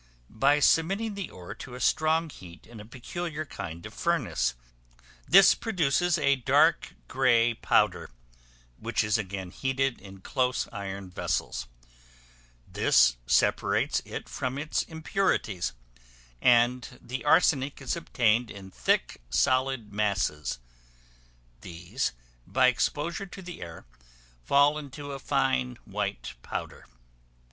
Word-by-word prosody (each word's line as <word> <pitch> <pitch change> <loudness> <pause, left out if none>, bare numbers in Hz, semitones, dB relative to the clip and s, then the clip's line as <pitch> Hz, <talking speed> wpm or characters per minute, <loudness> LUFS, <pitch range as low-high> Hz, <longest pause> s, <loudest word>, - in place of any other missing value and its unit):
By 145 +7 +3
submitting 195 +9 +2
the 200 -2 -5
ore 90 -1 -9
to 125 - -10
a - - -8
strong 155 +4 +1
heat 90 -7 -13
in 115 -1 -12
a 105 - -10
peculiar 155 +7 -5
kind 85 - -7
of - - -9
furnace; 60 - 0 0.7
this 195 +2 +8
produces 175 - +1
a 140 0 +2
dark 125 - +2
grey 120 -1 +3
powder, - - +1 0.7
which - - 0
is 105 +1 +1
again 95 -3 -5
heated 135 +1 -1
in 95 -1 -12
close 130 +3 0
iron 95 -2 -6
vessels; 90 - -2 1.0
this - - +4
separates - - +2
it - - -7
from 130 +1 -3
its 150 +2 -1
impurities, 160 - -1 0.7
and 125 +1 +3
the 125 +2 -6
arsenic 145 -3 +3
is 135 +2 -2
obtained 120 -8 +1
in 95 -1 -10
thick, - - 0
solid 130 - +1
masses; 95 - -1 1.0
these, 90 +9 -3 0.4
by 130 0 +3
exposure 150 - 0
to 190 - -10
the 180 0 -9
air, 85 -1 -9 0.6
fall 145 - +4
into 145 0 -8
a 135 - -6
fine, 130 -3 0
white 100 0 -4
powder. - - -6
125 Hz, 120 wpm, -28 LUFS, 100-150 Hz, 1.0 s, this